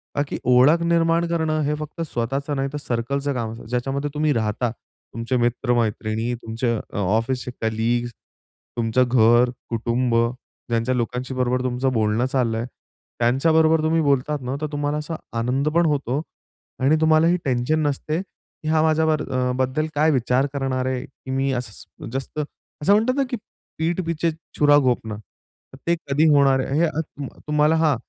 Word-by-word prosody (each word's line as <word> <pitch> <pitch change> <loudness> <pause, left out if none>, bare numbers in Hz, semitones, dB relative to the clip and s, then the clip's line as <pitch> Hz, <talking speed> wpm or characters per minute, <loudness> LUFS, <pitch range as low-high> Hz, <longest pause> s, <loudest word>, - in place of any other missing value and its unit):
ताकी 145 0 -1
ओळख 140 +7 +6
निर्माण 170 0 +2
करणं 160 -2 0
हे 150 +1 0
फक्त 155 +2 -6
स्वतःच 135 -1 -3
नाहीतर, 140 0 -2
सर्कलचं 140 +3 -2
काम 115 -3 -3
ज्याच्यामध्ये 135 +5 -2
तुम्ही 150 0 +1
राहता. 110 +1 0
तुमचे 115 +1 -6
मित्र-मैत्रिणी, 120 -2 0
तुमचे 115 +2 -1
अ, - - -2 0.2
ऑफिसचे 115 +6 0
कलीग्स, 115 +2 0 0.7
तुमचं 115 +2 +2
घर, 120 0 +5 0.2
कुटुंब 120 +1 0 0.5
ज्यांच्या 115 +2 +1
लोकांशी 125 +2 -2
बरोबर 125 0 0
तुमचं 130 +1 0
बोलणं 110 +1 +1
चाललं 125 -4 0
आहे. 115 - -2 0.5
त्यांच्याबरोबर 160 +6 +3
तुम्ही 160 +1 +2
बोलतात 145 0 +1
ना, 130 +1 -3
तर 155 - -1
तुम्हाला 145 0 -1
असा 150 +2 -4 0.2
आनंद 130 +5 0
पण 170 0 +4
होतो 145 -2 0 0.6
आणि 135 +4 +4
तुम्हालाही 160 +2 +4
टेन्शन 130 +4 +1
नसते, 155 +3 -2
की 190 -4 -14
हा 155 0 +3
माझ्यावर 160 -1 +2
अ, 125 -1 +1
बद्दल 130 +4 0
काय 155 +2 +4
विचार 130 0 +2
करणार 135 -2 -1
आहे, 130 0 -2
की 130 0 -11
मी 135 +1 0
असं 120 -4 -7
जास्त, 135 +4 -5 0.4
असं 195 +7 +4
म्हणतात 225 +5 +3
ना, 275 - +3
की 245 - -2 0.4
"पीठ 165 +3 0
पीछे 165 0 0 0.3
छुरा 145 -1 +6
घोपना." 120 -5 0 0.7
ते 170 - +4
कधी 150 -2 0
होणार 140 -2 +5
आहे, 135 +3 -1
हे 170 - +4
अ, 155 -1 -2
त 145 -2 -9
अ, - - -20
तुम्हाला 150 +1 +3
हां. 160 -3 +3
135 Hz, 160 wpm, -22 LUFS, 120-155 Hz, 0.7 s, ओळख